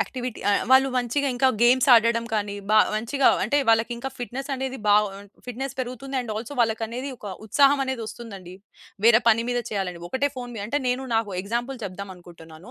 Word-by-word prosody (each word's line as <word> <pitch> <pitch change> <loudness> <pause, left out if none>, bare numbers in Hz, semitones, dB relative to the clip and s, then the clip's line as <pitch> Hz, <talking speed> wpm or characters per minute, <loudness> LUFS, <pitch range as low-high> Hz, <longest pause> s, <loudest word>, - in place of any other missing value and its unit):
Activity 250 -2 -4
ఆహ్, 205 - +2
వాళ్ళు 265 +1 +6
మంచిగా 250 +4 0
ఇంకా 260 +2 +3
గేమ్స్ 250 +1 +5
ఆడడం 230 0 +4
కానీ 205 -2 -1
బా 215 - +6 0.2
మంచిగా 235 +6 +2 0.2
అంటే 280 +8 +1
వాళ్ళకింకా 235 +3 +1
ఫిట్‌నెస్ 255 +3 -5
అనేది 265 0 -4
బాగా 210 +1 +5
ఉన్ 200 -1 -16 0.2
ఫిట్‌నెస్ 265 +2 -5
పెరుగుతుంది. 255 +2 -5
అండ్ 235 -3 -5
ఆల్సో 230 +6 -6
వాళ్ళకనేది 230 +4 -1
ఒక 210 - -10 0.2
ఉత్సాహమనేది 270 0 +2
ఒస్తుందండి. 200 -6 -9 0.5
వేరే 235 0 +7
పని 230 +1 +3
మీద 245 0 0
చేయాలని. 190 -4 -3
ఒకటే 270 +7 0
ఫోన్ 245 -1 -6
మీద 200 - -4
అంటే 290 +4 0
నేను 250 +2 -1
నాకు 220 -3 -1
ఎగ్జాంపుల్ 240 +5 -3
చెప్దాం 200 0 -7
అనుకుంటున్నాను. 170 +2 -14
235 Hz, 175 wpm, -24 LUFS, 215-260 Hz, 0.5 s, వేరే